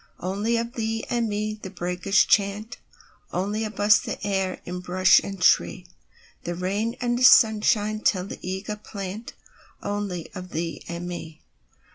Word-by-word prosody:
Only 205 Hz, +6 st, -1 dB
of 235 Hz, +1 st, -3 dB
thee 225 Hz, -1 st, -2 dB
and 235 Hz, -2 st, +1 dB
me 215 Hz, +1 st, -3 dB
the 190 Hz, -, -6 dB
breakers 180 Hz, +1 st, +1 dB
chant, 205 Hz, +2 st, +1 dB, 0.5 s
Only 205 Hz, +4 st, -1 dB
of 215 Hz, -, -7 dB
us 210 Hz, +1 st, +6 dB
the -, -, -4 dB
stir 195 Hz, -2 st, -1 dB
in 180 Hz, +1 st, -5 dB
bush 185 Hz, +1 st, +4 dB
and 195 Hz, -1 st, -6 dB
tree; -, -, +3 dB, 0.6 s
The 175 Hz, -, -3 dB
rain 200 Hz, +6 st, -1 dB
and 245 Hz, 0 st, 0 dB
sunshine 215 Hz, -3 st, +5 dB
tell 185 Hz, -4 st, +1 dB
the -, -, -8 dB
eager 190 Hz, +3 st, -4 dB
plantOnly 205 Hz, -2 st, -7 dB
of 185 Hz, -1 st, -7 dB
thee 165 Hz, 0 st, -4 dB
and 170 Hz, +1 st, -5 dB
me. 160 Hz, -3 st, -8 dB
200 Hz, 145 wpm, -25 LUFS, 185-215 Hz, 0.6 s, us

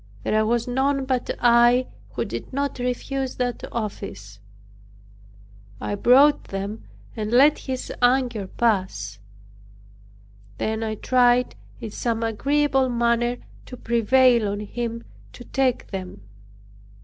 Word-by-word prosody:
There 215 Hz, 0 st, +1 dB
was 235 Hz, +1 st, 0 dB
none 270 Hz, +2 st, 0 dB
but 255 Hz, -2 st, -1 dB
I 240 Hz, +1 st, +5 dB, 0.3 s
who -, -, -2 dB
did -, -, -6 dB
not 280 Hz, 0 st, -2 dB
refuse 255 Hz, +2 st, -3 dB
that 245 Hz, -1 st, -3 dB
office. 105 Hz, -, -6 dB, 1.4 s
I -, -, -3 dB
brought 260 Hz, +8 st, +5 dB
them 200 Hz, +3 st, -5 dB, 0.3 s
and 215 Hz, -1 st, -3 dB
let 275 Hz, +6 st, +5 dB
his 260 Hz, -1 st, -5 dB
anger 245 Hz, -5 st, +2 dB
pass; 185 Hz, -, -1 dB, 1.4 s
then 220 Hz, -, -2 dB
I 220 Hz, -1 st, -2 dB
tried 245 Hz, +1 st, +2 dB, 0.3 s
in 225 Hz, -3 st, -7 dB
some 230 Hz, +1 st, -2 dB
agreeable 270 Hz, +4 st, +1 dB
manner 240 Hz, 0 st, +1 dB, 0.3 s
to 250 Hz, -, -9 dB
prevail 235 Hz, 0 st, +3 dB
on 205 Hz, +1 st, -3 dB
him 230 Hz, +2 st, -5 dB, 0.3 s
to 245 Hz, -, -11 dB
take 260 Hz, -2 st, -1 dB
them. 185 Hz, -, -7 dB
240 Hz, 115 wpm, -23 LUFS, 215-255 Hz, 1.4 s, I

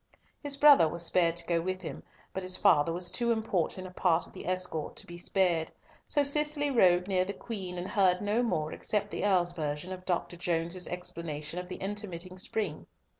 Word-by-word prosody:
His 285 Hz, -2 st, -1 dB
brother 285 Hz, -, +7 dB
was 170 Hz, +2 st, -2 dB
spared 170 Hz, -1 st, +3 dB
to -, -, -3 dB
go 170 Hz, -1 st, +1 dB
with 185 Hz, +2 st, -3 dB
him, 160 Hz, -, -6 dB, 0.3 s
but 190 Hz, -, -3 dB
his 185 Hz, 0 st, +2 dB
father 145 Hz, +3 st, +4 dB
was 175 Hz, +1 st, 0 dB
too 235 Hz, +5 st, +1 dB
important 190 Hz, -5 st, -1 dB
a 185 Hz, -, -8 dB
part 175 Hz, -2 st, +1 dB
of -, -, -18 dB
the -, -, -9 dB
escort 180 Hz, -4 st, -2 dB
to -, -, -4 dB
be 175 Hz, -, -10 dB
spared. 175 Hz, -2 st, +1 dB, 0.4 s
So 290 Hz, -, +2 dB
Cicely 290 Hz, 0 st, +2 dB
rode 180 Hz, -7 st, +4 dB
near 185 Hz, -2 st, +2 dB
the 195 Hz, +2 st, -4 dB
Queen, 190 Hz, -7 st, -6 dB
and 175 Hz, +1 st, -4 dB
heard 185 Hz, -3 st, +3 dB
no 210 Hz, +3 st, +1 dB
more 155 Hz, -10 st, -1 dB
except 205 Hz, -1 st, -2 dB
the -, -, -3 dB
Earl's 180 Hz, -4 st, +2 dB
version 155 Hz, +1 st, -4 dB
of 185 Hz, -1 st, -7 dB
Dr. 175 Hz, -1 st, -2 dB
Jones's 170 Hz, +1 st, -1 dB
explanation 170 Hz, -2 st, -5 dB
of 180 Hz, -, -7 dB
the -, -, -6 dB
intermitting 185 Hz, -3 st, -5 dB
spring. 190 Hz, -5 st, -3 dB
180 Hz, 200 wpm, -30 LUFS, 170-205 Hz, 0.4 s, brother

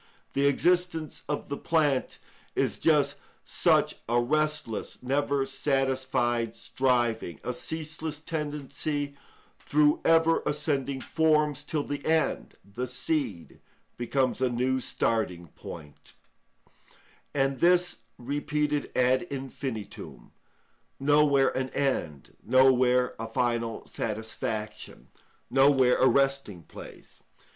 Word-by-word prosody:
The 140 Hz, +1 st, +2 dB
existence 175 Hz, +1 st, +1 dB
of 150 Hz, -, -3 dB
the 140 Hz, -, -3 dB
plant 150 Hz, -5 st, +1 dB, 0.4 s
is -, -, 0 dB
just 145 Hz, -3 st, +3 dB, 0.3 s
such -, -, +2 dB
a 120 Hz, +1 st, +3 dB
restless, 150 Hz, -3 st, -1 dB
never 140 Hz, +1 st, +1 dB
satisfied 130 Hz, -4 st, 0 dB
striving, 115 Hz, -, 0 dB
a -, -, -2 dB
ceaseless 155 Hz, -1 st, -4 dB
tendency 145 Hz, -2 st, -3 dB, 0.4 s
through 150 Hz, 0 st, +2 dB
ever 165 Hz, 0 st, +4 dB
ascending 140 Hz, -2 st, -1 dB
forms, 150 Hz, -2 st, +1 dB
till 150 Hz, -1 st, -2 dB
the 145 Hz, -1 st, -5 dB
end, 160 Hz, 0 st, 0 dB
the 115 Hz, +6 st, -5 dB
seed, 125 Hz, -, -3 dB, 0.4 s
becomes 130 Hz, +1 st, 0 dB
a 130 Hz, -, +3 dB
new 130 Hz, +2 st, 0 dB
starting 90 Hz, -9 st, -1 dB
point; 75 Hz, -1 st, -11 dB, 1.2 s
and 135 Hz, -1 st, +1 dB
this 180 Hz, +1 st, +3 dB, 0.2 s
repeated 145 Hz, +3 st, -2 dB
ad 130 Hz, +5 st, +2 dB
infinitum—nowhere 135 Hz, +2 st, -2 dB
an 130 Hz, 0 st, -1 dB
end, 85 Hz, -, -2 dB
nowhere 130 Hz, -1 st, +4 dB
a 115 Hz, -, -4 dB
final 115 Hz, -1 st, -1 dB
satisfaction, 110 Hz, 0 st, -5 dB, 0.4 s
nowhere 135 Hz, -2 st, +5 dB
a -, -, +5 dB
resting 135 Hz, -11 st, +1 dB
place. -, -, -13 dB
135 Hz, 100 wpm, -28 LUFS, 120-150 Hz, 1.2 s, nowhere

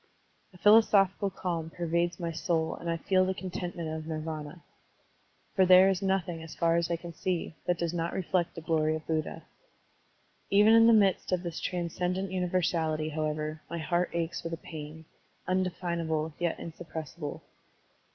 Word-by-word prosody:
A 180 Hz, -, -16 dB
philosophical 200 Hz, -1 st, +5 dB
calm 170 Hz, -4 st, -3 dB
pervades 170 Hz, +1 st, -1 dB
my 170 Hz, -1 st, -2 dB
soul 160 Hz, 0 st, 0 dB
and 170 Hz, -, -6 dB
I 165 Hz, -, 0 dB
feel 185 Hz, +3 st, +2 dB
the 190 Hz, 0 st, -1 dB
contentment 175 Hz, -3 st, -5 dB
of 155 Hz, 0 st, -4 dB
Nirvdna. 155 Hz, 0 st, -5 dB, 0.9 s
For 190 Hz, -, +5 dB
there 185 Hz, +1 st, +7 dB
is 190 Hz, 0 st, -2 dB
nothing, 190 Hz, -4 st, -1 dB
as 160 Hz, -1 st, -9 dB
far 165 Hz, -1 st, +2 dB
as 170 Hz, 0 st, +1 dB
I 170 Hz, -, +1 dB
can 170 Hz, 0 st, -8 dB
see, 175 Hz, -1 st, -2 dB
that 175 Hz, -1 st, +2 dB
does 170 Hz, 0 st, -2 dB
not 170 Hz, 0 st, -1 dB
reflect 180 Hz, -2 st, -1 dB
the 165 Hz, -, -6 dB
glory 155 Hz, -1 st, +1 dB
of 155 Hz, -, -7 dB
Buddha. 160 Hz, -1 st, -2 dB, 1.1 s
Even 210 Hz, +2 st, +6 dB
in 225 Hz, 0 st, +7 dB
the -, -, +7 dB
midst 200 Hz, -5 st, +3 dB
of 180 Hz, -1 st, 0 dB
this 170 Hz, -2 st, -4 dB
transcendent 180 Hz, +2 st, -2 dB
universality, 175 Hz, -4 st, 0 dB
however, 155 Hz, 0 st, -3 dB
my 170 Hz, -, -4 dB
heart 175 Hz, +3 st, 0 dB
aches 170 Hz, 0 st, -2 dB
with 165 Hz, 0 st, -4 dB
a -, -, -2 dB
pain, 160 Hz, 0 st, -9 dB, 0.4 s
undefinable 170 Hz, -4 st, -1 dB
yet 175 Hz, -1 st, 0 dB
insuppressible. 160 Hz, -2 st, -7 dB
170 Hz, 160 wpm, -29 LUFS, 160-185 Hz, 1.1 s, there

